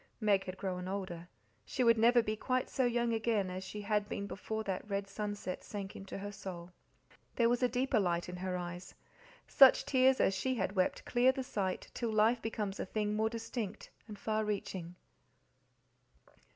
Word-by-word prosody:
Meg 205 -3 +2
had 185 0 -6
grown 185 -2 -3
older; 185 -3 -4 0.4
she 255 - -1
would 230 -1 +6
never 240 +1 +5
be 215 0 -1
quite 255 +3 -1
so 260 - +1
young 240 -1 +1
again 220 -4 0
as 185 +1 -5
she 210 +2 -6
had 205 0 0
been 200 - -3
before 220 +2 -4
that 200 +1 -4
red 200 0 -1
sunset 205 -2 -4
sank 200 -2 -6
into 195 0 -7
her 205 +1 -5
soul. 180 -3 -8 0.6
There 235 - +4
was 245 +1 +1
a 250 - +3
deeper 250 0 +1
light 175 -3 0
in 180 0 -6
her 180 0 -2
eyes; 175 0 -7 0.5
such 270 -3 +7
tears 260 0 +4
as 195 - +3
she 260 +7 -1
had 195 -2 -2
wept 185 -1 0
clear 250 +1 +4
the 265 0 -4
sight 190 -6 -3
till 235 -2 -2
life 220 +2 +3
becomes 210 -3 -3
a - - -2
thing 210 +1 -1
more 220 +1 +2
distinct 225 -2 -5 0.2
and 210 -2 -8
far 215 +1 -1
reaching. 190 -4 -4
210 Hz, 185 wpm, -33 LUFS, 190-230 Hz, 0.6 s, such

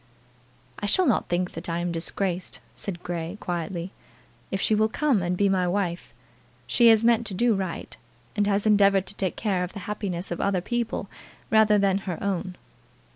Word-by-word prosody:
"I 205 - -2
shall 370 - +3
not 260 - +1
think 180 +1 0
that 165 +2 -6
I 165 - -1
am 175 0 -1
disgraced," 180 +2 -2
said 175 -4 -5
Grey, 175 +2 -4
quietly, 175 +1 -4 0.6
"if 195 - -2
she 215 - +2
will 215 +1 +3
come 265 -3 +1
and 175 +1 -1
be 200 - +3
my 185 -2 +2
wife. 175 -2 -2 0.5
She 235 - +4
has 225 0 +6
meant 235 -1 +3
to 195 - -4
do 235 +4 +3
right, 190 -4 -4 0.4
and 205 -1 +1
has 200 0 +1
endeavoured 200 -2 +4
to - - -6
take 190 -3 -2
care 195 -5 0
of 180 - -5
the 205 - -6
happiness 195 -4 -3
of 175 - -2
other 200 -2 +1
people 235 +5 -2 0.4
rather 220 -1 +5
than 195 -1 +2
her 175 - -2
own." 190 -2 -2
195 Hz, 185 wpm, -26 LUFS, 175-210 Hz, 0.6 s, has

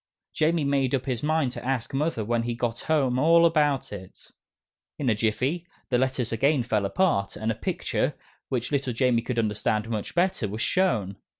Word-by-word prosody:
Jamie 160 0 +1
made 140 -2 +1
up 130 - -3
his 125 -4 -2
mind 155 -3 +1
to - - -8
ask 125 -2 -2
Mother 135 -6 -1
when 120 +1 +1
he 120 0 -3
got 120 -1 -2
home 135 -5 +1
all 165 +3 +5
about 150 -7 +2
it. 95 -2 -11 0.7
In 135 -4 0
a - - +4
jiffy, 130 +11 -1 0.2
the 125 - +2
Letters 130 -2 0
again 135 +4 +2
fell 105 -4 0
apart, 100 - +1
and 110 +1 -1
a - - 0
picture, - - -2 0.3
which 125 0 -2
little 135 -3 0
Jamie 120 0 +2
could 120 +1 -4
understand 110 0 0
much 110 +5 -4
better, 175 - +1
was 105 +3 -5
shown. 110 - +1
125 Hz, 185 wpm, -26 LUFS, 115-150 Hz, 0.7 s, all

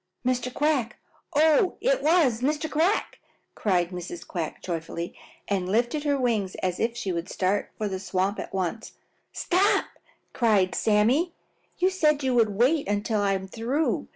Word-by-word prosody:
"Mr. 250 0 0
Quack! 280 -4 0 0.4
Oh, 315 +4 +4
it - - +1
was 300 -8 +3
Mr. 295 +3 0
Quack!" 320 +7 0 0.3
cried 180 -4 +1
Mrs. 180 -1 -7
Quack 165 -3 -4
joyfully 170 0 -4 0.3
and 190 -3 -1
lifted 240 +7 0
her 285 -1 +2
wings 220 -7 0
as 180 -1 -2
if 230 +1 -1
she 205 -6 -2
would 170 +1 -3
start 195 +2 0
for 215 - -2
the 190 -2 -3
swamp 190 +1 -1
at - - -6
once. 195 +4 -3 0.4
"Stop!" 375 +4 +2 0.5
cried 210 -6 +2
Sammy 215 +6 +3
sharply. 340 0 -3 0.4
"You 365 +1 +3
said 305 -6 +2
you 260 -1 +1
would 230 -3 +4
wait 275 +8 +2
until 205 +1 0
I 200 -1 +2
am 190 0 -3
through. 245 +10 -1
230 Hz, 160 wpm, -26 LUFS, 190-295 Hz, 0.5 s, Oh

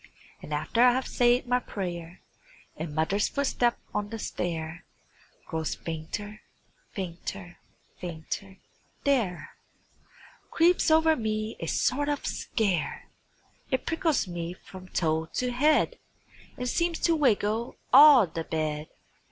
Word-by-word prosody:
And - - -10
after 150 +10 0
I 250 0 +7
have 260 +1 -1
said 245 +1 +3
my 250 0 +2
prayer 175 -6 -6 0.5
And 155 -2 -6
mother's 195 +6 +1
footstep 255 -4 +1 0.2
on 205 0 -2
the 225 - -5
stair 170 -4 -4 0.6
Grows 160 -1 -3
fainter, 205 +7 -6 0.5
fainter, 180 0 -6 0.4
fainter, 180 +3 -6 0.5
there 230 -11 0 1.0
Creeps 345 +1 +3
over 320 0 +5
me 215 -2 -2
a 165 - -4
sort 285 - +1
of 290 -1 -2
scare; 185 -10 -1 0.6
It 260 - -1
prickles 325 - +1
me 175 -1 -4
from 185 0 -12
toe 160 -2 0
to 250 0 -1
head 300 - +2 0.6
And 250 -1 -3
seems 340 +5 0
to 335 - +3
wiggle 230 -5 +1 0.2
all 285 -6 +9
the 165 -1 -5
bed. 155 -1 -2
210 Hz, 120 wpm, -28 LUFS, 170-255 Hz, 1.0 s, all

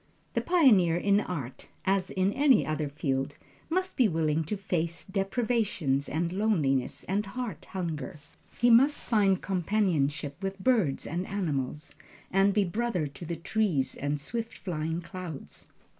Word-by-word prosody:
The - - +1
pioneer 215 - +5
in 200 +3 +3
art, 145 - -5 0.2
as 190 -1 +2
in 190 +2 +1
any 275 -4 +4
other 155 -1 -2
field, 140 -1 -2 0.3
must 370 +3 0
be 250 - +5
willing 160 -3 +1
to 210 +7 -3
face 170 -3 -1
deprivations 195 - 0
and 170 +3 -1
loneliness 160 - +1
and 200 +3 0
heart 245 +1 -5
hunger. 160 -6 -4 0.4
He 240 0 +4
must 270 +6 +6
find 200 -5 +2
companionship 165 -6 0
with 195 0 -3
birds 200 - +1
and 175 +4 -3
animals, 150 -6 -3 0.4
and 195 +1 +4
be 205 +1 +3
brother 205 -2 -1
to 145 +4 -8
the 170 - -2
trees 165 -6 0
and 145 +1 -2
swift 230 +9 -5
flying 165 -2 -3
clouds. 175 -5 -8
185 Hz, 145 wpm, -29 LUFS, 155-210 Hz, 0.4 s, must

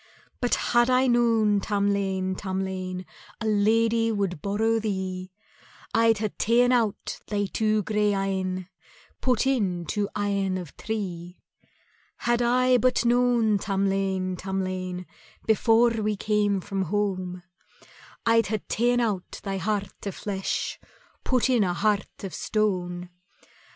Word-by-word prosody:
"But 245 - +2 0.2
had 240 +1 +5
I 255 +1 +4
known, 230 -4 +3
Tamlane, 200 -2 0
Tamlane, 185 -1 -4 0.3
A 225 - -4
lady 225 +2 +3
would 195 -7 -2
borrow 220 +3 +1
thee, 190 -3 -3 0.6
I'd 225 -1 +4
hae 215 0 -1
ta'en 240 +3 +4
out 230 -5 0
thy 205 -1 0
two 215 +1 0
grey 210 0 +1
eyne, 190 -2 -2 0.5
Put 255 0 +2
in 195 -10 0
two 205 +5 -1
eyne 200 -2 0
of 175 -6 -8
tree. 180 -5 -5 0.8
"Had 240 0 +1
I 250 +1 +4
but 250 +1 +2
known, 235 -3 +3
Tamlane, 195 -1 0
Tamlane, 185 -1 -3 0.4
Before 225 +2 +4
we 215 -2 -1
came 205 -1 +1
from 195 +1 -3
home, 185 -2 -2 0.8
I'd 230 0 +4
hae 215 - 0
ta'en 240 +4 +1
out 205 -6 -2
thy 195 -1 -2
heart 205 -1 -3
o' - - -1
flesh, 195 0 -3 0.4
Put 255 -2 +2
in 245 -5 +3
a 180 -2 0
heart 205 +2 -1
of 195 - -5
stone. 180 -4 -1
205 Hz, 125 wpm, -26 LUFS, 190-225 Hz, 0.8 s, had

